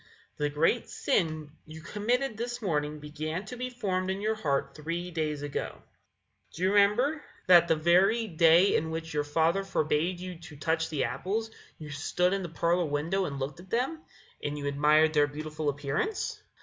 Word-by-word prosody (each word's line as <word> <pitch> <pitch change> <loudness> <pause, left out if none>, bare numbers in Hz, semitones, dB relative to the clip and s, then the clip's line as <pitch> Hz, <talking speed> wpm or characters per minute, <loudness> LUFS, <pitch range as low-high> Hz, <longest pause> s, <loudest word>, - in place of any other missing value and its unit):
The 150 0 0
great 165 +11 +1
sin 155 -4 -1 0.2
you 155 +1 -9
committed 240 +8 -1
this 240 +2 -4
morning 150 -7 -1
began 155 +5 -5
to 250 - -7
be 250 +1 -4
formed 190 -7 -2
in 190 +1 -1
your 215 +2 0
heart 145 -11 -1
three 170 +3 -4
days 155 -3 -2
ago. 145 - -4 0.7
Do 175 - -4
you 185 - +4
remember 240 +10 +3 0.2
that 175 -2 +7
that 160 - +3
very 190 +8 +3
day 170 +1 +5
in 160 - 0
which 160 0 -5
your 150 -1 +1
father 165 +6 +1
forbade 170 -1 0
you 180 -2 -7
to 165 -3 -11
touch 160 +3 -1
the 150 -4 -1
apples, 195 - -2 0.3
you 150 -2 -9
stood 180 +5 0
in 195 - -1
the 175 - -5
parlour 170 +2 +1
window 160 +6 0
and 140 -3 -4
looked 140 +5 -4
at 185 +2 -13
them, 265 +7 -1 0.4
and 145 0 -2
you 145 - -5
admired 150 +2 +4
their 145 -1 +4
beautiful 155 +1 -4
appearance? 145 - -2
165 Hz, 180 wpm, -29 LUFS, 150-195 Hz, 0.7 s, that